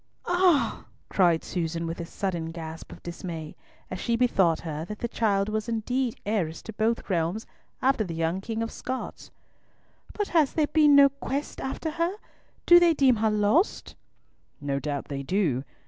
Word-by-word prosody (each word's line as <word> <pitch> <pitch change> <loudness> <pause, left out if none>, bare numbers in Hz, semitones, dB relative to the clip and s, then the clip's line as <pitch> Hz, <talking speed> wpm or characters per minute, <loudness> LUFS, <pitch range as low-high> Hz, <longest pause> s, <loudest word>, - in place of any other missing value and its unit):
"Ah!" 350 -9 +2 0.2
cried 175 -4 +3
Susan, 165 -1 -3
with 165 +1 -4
a 165 - -6
sudden 175 -4 -3
gasp 165 -1 -8
of - - -12
dismay, 170 -2 -6 0.4
as 185 - -4
she 235 +4 0
bethought 195 -9 +2
her 155 -2 -4
that 210 +4 -7
the 235 - -3
child 205 -4 +1
was 215 +1 -2
indeed 240 +2 -1
heiress 190 -7 -1
to 220 - -8
both 225 +2 0
realms 180 +3 -1 0.4
after 265 -4 +3
the 170 -5 -5
young 165 +3 -1
King 225 +2 -3
of 230 - -4
Scots. 260 0 -6 0.8
"But 415 -1 -2
has 315 -5 +3
there 310 - +2
been 295 -1 +5
no 280 0 +8
quest 280 +1 -4
after 290 +4 -3
her? 335 +4 -1 0.5
Do 345 0 +9
they 340 -2 +4
deem 260 -4 +4
her 220 +1 +2
lost?" 210 - +1 0.7
"No 140 -1 -2
doubt 145 -1 -3
they 140 -1 -4
do. 140 -4 0
210 Hz, 170 wpm, -27 LUFS, 165-265 Hz, 0.8 s, Do